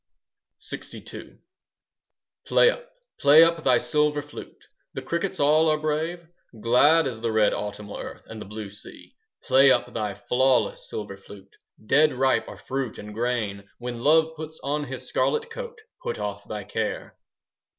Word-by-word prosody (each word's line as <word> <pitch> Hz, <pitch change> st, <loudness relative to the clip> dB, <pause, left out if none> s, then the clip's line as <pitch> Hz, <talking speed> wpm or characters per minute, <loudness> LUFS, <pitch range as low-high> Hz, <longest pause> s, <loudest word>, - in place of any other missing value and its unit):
LXII -, -, -9 dB, 1.1 s
Play 485 Hz, -, +5 dB
up, -, -, -10 dB, 0.3 s
play 145 Hz, +3 st, +8 dB
up 165 Hz, -1 st, +1 dB
thy -, -, +5 dB
silver 150 Hz, -1 st, +1 dB
flute; 145 Hz, -, -12 dB, 0.3 s
The -, -, -4 dB
crickets 170 Hz, +3 st, -2 dB
all 155 Hz, +2 st, +4 dB
are 155 Hz, -, +2 dB
brave; 155 Hz, +3 st, -2 dB, 0.3 s
Glad 145 Hz, +9 st, +5 dB
is 120 Hz, -4 st, -4 dB
the 115 Hz, -1 st, -1 dB
red 110 Hz, -1 st, +3 dB
autumnal 105 Hz, 0 st, -5 dB
earth -, -, -8 dB
And 110 Hz, -1 st, -9 dB
the -, -, -8 dB
blue 105 Hz, -1 st, -7 dB
sea. 105 Hz, -, -14 dB, 0.3 s
Play 135 Hz, 0 st, +5 dB
up 120 Hz, -1 st, +2 dB
thy 105 Hz, -3 st, -3 dB
flawless 130 Hz, +3 st, +1 dB
silver 100 Hz, -2 st, -6 dB
flute; 100 Hz, 0 st, -15 dB, 0.3 s
5 110 Hz, -, -21 dB
Dead 150 Hz, +4 st, +4 dB
ripe 130 Hz, +1 st, +1 dB
are -, -, -9 dB
fruit 135 Hz, -4 st, -4 dB
and 105 Hz, 0 st, -9 dB
grain. 105 Hz, -4 st, -2 dB
When 120 Hz, -1 st, -6 dB
love 160 Hz, +4 st, +3 dB
puts 160 Hz, 0 st, -8 dB
on 145 Hz, +1 st, -1 dB
his 130 Hz, -1 st, -7 dB
scarlet 455 Hz, 0 st, 0 dB
coat, 475 Hz, -1 st, -7 dB, 0.2 s
Put 485 Hz, -2 st, -3 dB
off -, -, -5 dB
thy -, -, -5 dB
care. -, -, -4 dB
135 Hz, 160 wpm, -25 LUFS, 110-155 Hz, 1.1 s, play